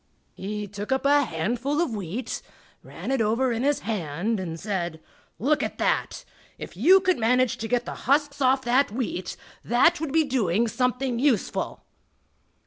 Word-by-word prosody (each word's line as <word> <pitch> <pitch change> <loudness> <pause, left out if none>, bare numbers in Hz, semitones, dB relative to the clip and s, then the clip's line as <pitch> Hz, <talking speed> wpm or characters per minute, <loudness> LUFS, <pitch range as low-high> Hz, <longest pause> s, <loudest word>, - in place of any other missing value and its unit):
He 210 +2 -5
took 205 +3 -7
up 265 +1 0
a 285 0 +4
handful 240 - -2
of 340 -9 0
wheat, 205 +5 -4 0.4
ran - - -7
it 270 -3 +1
over 230 +4 +1
in 230 0 -1
his 290 +1 +1
hand 195 +1 -2
and 165 -3 -5
said: 175 -5 -3 0.4
"Look 295 +7 +1
at - - -3
that! - - -1 0.3
If - - -9
you 340 - +6
could 370 -5 +1
manage 250 +2 +2
to 225 - -4
get 245 +1 0
the - - -5 0.2
husks 285 0 +2
off 265 0 +3
that 255 +3 +3
wheat, 215 -6 -4 0.3
that 310 +9 +3
would 320 -4 -2
be 320 +2 +4
doing 235 - +1
something 250 +1 -1
useful!" 255 -7 0
245 Hz, 165 wpm, -25 LUFS, 210-275 Hz, 0.4 s, you